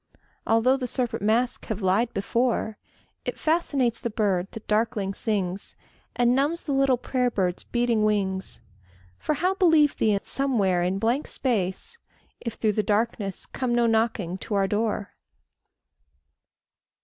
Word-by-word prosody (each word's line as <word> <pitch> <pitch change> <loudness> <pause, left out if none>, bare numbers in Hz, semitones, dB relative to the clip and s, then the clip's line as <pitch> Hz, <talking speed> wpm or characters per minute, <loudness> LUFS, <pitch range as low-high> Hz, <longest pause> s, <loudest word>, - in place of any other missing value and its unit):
Although 230 +4 +4
the 255 -2 -3
serpent 240 -3 -2
mask 230 +4 +1
have 215 -2 -4
lied 205 +6 +2
before, 225 +1 -1 0.4
It - - -4
fascinates 290 -7 +1
the 235 - -2
bird 195 -4 0
that 225 - -10
darkling 210 -2 0
sings, 195 -3 -1 0.4
And 245 0 +3
numbs 290 +6 +1
the 290 - -3
little 270 -2 +3
prayer 250 0 0
bird's 185 -6 -1
beating 240 -3 +1
wings. 195 -3 0 0.6
For 305 - -1
how 365 +5 +1
believe 325 -6 +4
thee 210 -2 +2
somewhere 210 -10 +1
in 180 +2 0
blank 235 +8 0
space, 245 - -1 0.4
If 230 -2 -5
through 215 -2 +1
the 215 - +1
darkness 210 -2 -1
come 250 -2 -2
no 240 0 +3
knocking 220 -5 0
to 205 - -4
our 195 -1 +3
door? 210 0 -1
225 Hz, 140 wpm, -25 LUFS, 200-255 Hz, 0.6 s, Although